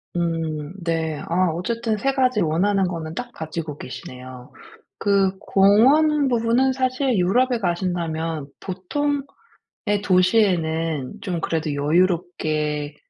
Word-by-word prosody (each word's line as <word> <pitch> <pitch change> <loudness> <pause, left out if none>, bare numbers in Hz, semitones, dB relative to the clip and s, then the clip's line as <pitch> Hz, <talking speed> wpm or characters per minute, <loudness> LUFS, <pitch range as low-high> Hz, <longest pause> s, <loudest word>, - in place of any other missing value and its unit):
음 165 -2 -2
네. 160 -2 -1
아 180 +1 +2
어쨌든 220 +6 -2
3 270 +6 0
가지 255 -5 +2
원하는 185 +4 +2
거는 160 -2 -5
딱 245 +6 -6
가지고 160 -4 -6
계시네요. 130 -1 -9 0.5
그 195 -1 +2
공원 275 +10 +4
부분은 245 +2 +2
사실 255 0 0
유럽에 240 +7 +2
가신다면 170 -5 -2
보통의 280 +10 -2 0.8
도시에는 170 - +1
좀 175 -3 -3
그래도 160 -3 -1
여유롭게 155 -2 0
180 Hz, 235 characters per minute, -22 LUFS, 160-230 Hz, 0.8 s, 공원